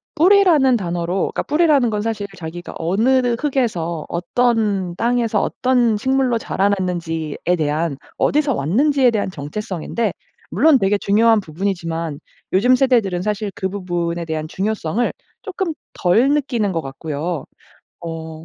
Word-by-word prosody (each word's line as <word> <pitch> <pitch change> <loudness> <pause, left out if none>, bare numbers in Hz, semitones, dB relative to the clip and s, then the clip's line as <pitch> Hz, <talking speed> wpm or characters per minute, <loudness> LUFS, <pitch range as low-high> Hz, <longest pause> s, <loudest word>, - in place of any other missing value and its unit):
뿌리라는 330 -8 +5
단어로 175 -2 -3 0.2
그러니까 - - -2
뿌리라는 295 -7 +3
건 210 -1 -1
사실 215 -2 -2
자기가 175 0 -8
어느 235 +8 +2
흙에서 210 - -1
어떤 200 -1 0
땅에서 230 -1 +1
어떤 245 -4 +1
식물로 260 +1 +1
자라났는지에 180 -7 -1 0.2
대한 150 -1 -1 0.2
어디서 290 -4 +2
왔는지에 255 - +2
대한 205 -3 -1
정체성인데 185 +5 -3 0.4
물론 275 - +4
되게 195 +1 +2
중요한 220 +2 +3
부분이지만 165 -3 -3 0.3
요즘 245 +7 +5
세대들은 235 -9 +2
사실 210 0 -2
그 190 - -3
부분에 175 -3 -3
대한 155 -1 -3
중요성을 205 +3 -1 0.3
쪼끔 380 -4 -3 0.2
덜 225 +10 +3
느끼는 255 -9 0
것 165 -2 -1
같고요. 150 +3 -4 0.6
어. 160 -1 -7
200 Hz, 320 characters per minute, -20 LUFS, 170-245 Hz, 0.6 s, 뿌리라는